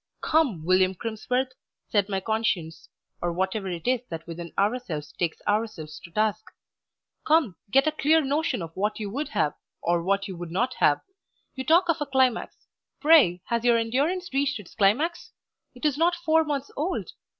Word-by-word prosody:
"Come, 265 - +1
William 185 +1 +3
Crimsworth," 245 +5 -2 0.4
said 205 -1 +2
my 195 -1 0
conscience, 190 -7 -2 0.3
or 175 - 0
whatever 190 +3 -2
it 175 +3 -5
is 250 -2 +2
that 165 -1 -6
within 170 0 -7
ourselves 200 -8 -1
takes 170 -2 -2
ourselves 205 -8 -2
to - - -12
task 215 +3 0 0.8
"come, 305 - +3
get 270 +6 +4
a 310 - +2
clear 310 +1 +3
notion 290 - 0
of 165 0 -9
what 210 +3 -1
you 205 -2 -4
would 285 +7 -2
have, 200 -9 0 0.3
or 170 0 +1
what 195 +2 0
you 190 - -6
would 175 0 -7
not 240 +9 0
have. 145 - +4 0.5
You 260 - -5
talk 335 +6 +4
of 335 -2 +2
a 295 - -1
climax; 260 -3 0 0.3
pray 280 - +5
has 235 -1 -1
your 240 -1 +5
endurance 285 +11 -1
reached 280 -1 +1
its 195 - -13
climax? 300 - +1 0.4
It 250 - -7
is 295 -1 +1
not 345 +1 +3
four 320 -1 +2
months 285 -2 -3
old. 330 +6 -2
225 Hz, 175 wpm, -26 LUFS, 185-285 Hz, 0.8 s, pray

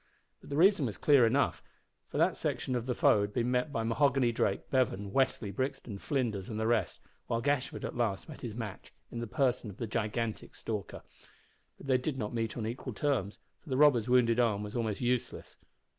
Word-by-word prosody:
But - - -15
the 140 - -2
reason 175 -5 +5
was 105 - -5
clear 140 -6 +5
enough, 135 +5 +1 0.5
for - - -6
that - - +3
section 130 - -2
of 120 0 -2
the 125 - 0
foe 105 - +4
had 100 0 -2
been 120 0 0
met 125 +4 0
by 115 -5 -1
Mahoghany 125 +1 +2
Drake, 100 -3 -1
Bevan, 105 -7 +1
Westly, 125 -4 +1
Brixton, 130 -5 -3
Flinders, 115 -9 -2
and 110 -1 -4
the 110 - 0
rest, 115 0 0 0.3
while 115 - 0
Gashford 140 +1 -1
at - - -5
last 110 -5 -1
met 155 - -10
his 115 -4 -5
match, 115 -5 -7 0.2
in 120 - -5
the 120 - -4
person 125 -2 0
of 100 - -10
the 115 - -3
gigantic 110 0 -3
Stalker. 105 -4 -5 0.7
But - - -12
they 130 -2 +3
did 135 +1 -3
not 105 -3 -3
meet 115 -1 -2
on 110 - -3
equal 120 +2 -5
terms, 115 -6 -1 0.2
for 160 - -16
the 130 - 0
robber's 130 -6 +5
wounded 125 -2 +4
arm 105 -4 +2
was 105 +2 -7
almost 110 -3 -1
useless. 125 0 -2
120 Hz, 205 wpm, -31 LUFS, 110-130 Hz, 0.7 s, reason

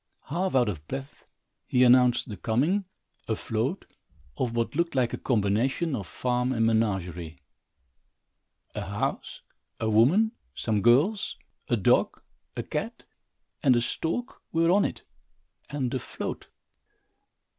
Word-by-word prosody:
Half 180 +4 -1
out 125 -3 +4
of 80 -7 -5
breath, 135 +2 -7 0.4
he 125 - +3
announced 125 -1 +5
the 105 - -6
coming, 140 - +1 0.4
afloat, 115 - -2 0.5
of 120 -2 -2
what 115 +3 -1
looked 170 -1 0
like 125 -3 +1
a - - -1
combination 125 +8 +1
of 100 -7 -5
farm 125 +4 -1
and 115 -3 +2
menagerie. 90 -7 0 1.4
A - - -4
house, - - -3 0.4
a 110 -1 0
woman, 160 - +4 0.2
some 105 -3 0
girls, 145 - +3 0.3
a 120 - +1
dog, 95 - +2 0.4
a - - -3
cat, - - -4 0.6
and 130 -3 +5
a 120 - +3
stork 165 - -3
were 165 +1 +3
on 200 +2 +4
it - - -4 0.7
and 135 -4 -2
afloat. 130 - -5
125 Hz, 125 wpm, -27 LUFS, 110-145 Hz, 1.4 s, announced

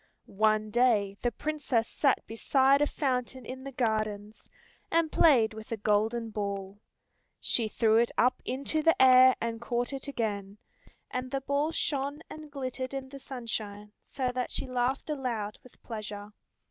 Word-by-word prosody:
One 215 +1 +1
day 215 -5 +3
the 240 - +2
Princess 280 -4 -1
sat 275 -3 +1
beside 265 +5 +3
a 295 - +4
fountain 255 -3 -2
in 260 +2 -7
the 275 - -6
gardens, 215 -4 -2 0.4
and 330 -1 +2
played 245 -9 +5
with 220 +1 -10
a 230 - -1
golden 220 +2 0
ball. 200 -1 -4 0.6
She 230 -3 +1
threw 220 0 +3
it 235 +1 +3
up 250 - +3
into 275 +5 -1
the 330 +1 +3
air 255 0 +8
and 230 0 -3
caught 240 +2 -2
it 270 0 -5
again, 205 -6 -3 0.5
and 255 0 -3
the 270 +1 -2
ball 280 +3 0
shone 285 -1 -2
and 310 -1 -9
glittered 260 -1 -4
in 265 -1 -5
the 275 0 -9
sunshine 215 -6 -5
so 260 -3 -3
that 250 0 -2
she - - -2
laughed 255 +1 -1
aloud 235 -7 -3
with 255 - -19
pleasure. 210 -2 -6
245 Hz, 160 wpm, -29 LUFS, 215-270 Hz, 0.6 s, air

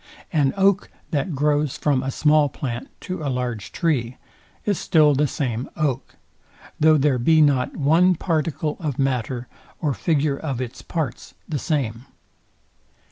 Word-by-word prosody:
An 145 -4 +3
oak, 195 0 +3 0.2
that 150 +1 -1
grows 145 0 +1
from 140 -3 +1
a 135 - -3
small 150 +1 +3
plant 120 -2 -5
to 185 -3 -5
a 145 - -2
large 125 -5 -3
tree, 130 -8 -1 0.5
is 205 -3 0
still 155 -3 +4
the 145 +2 +2
same 125 -3 -3
oak; 140 -5 -2 0.6
though 155 0 +6
there 135 -3 +2
be 160 +6 +4
not 140 -4 +2
one 165 +6 +4
particle 155 -2 -1
of 150 -7 -3
matter, 125 -2 -1 0.3
or 150 -4 0
figure 140 - 0
of 140 -6 -3
its 125 -1 -5
parts 150 -8 -4
the 150 -3 -2
same. 125 -6 -2
145 Hz, 145 wpm, -23 LUFS, 130-155 Hz, 0.6 s, though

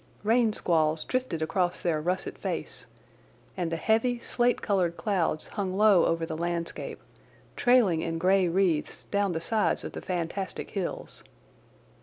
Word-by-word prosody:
Rain 225 +1 +3
squalls 160 -5 +1
drifted 255 -11 -2
across 175 +2 0
their 160 -3 0
russet 180 +4 -2
face, - - -4 0.7
and 175 -3 -2
the - - 0
heavy, 225 +7 +1
slate 240 +1 +1
coloured 180 -5 0
clouds 180 -7 -1
hung 190 -3 -3
low 210 -4 +5
over 165 0 0
the 160 -1 -5
landscape, 170 0 -3 0.6
trailing 230 -10 +4
in 165 0 -2
grey 185 +2 +3
wreaths 170 -3 0
down 200 -2 +1
the 160 - -1
sides 215 +6 0
of - - -5
the - - -7
fantastic 185 +2 -4
hills. 195 -4 -4
180 Hz, 145 wpm, -28 LUFS, 165-210 Hz, 0.7 s, low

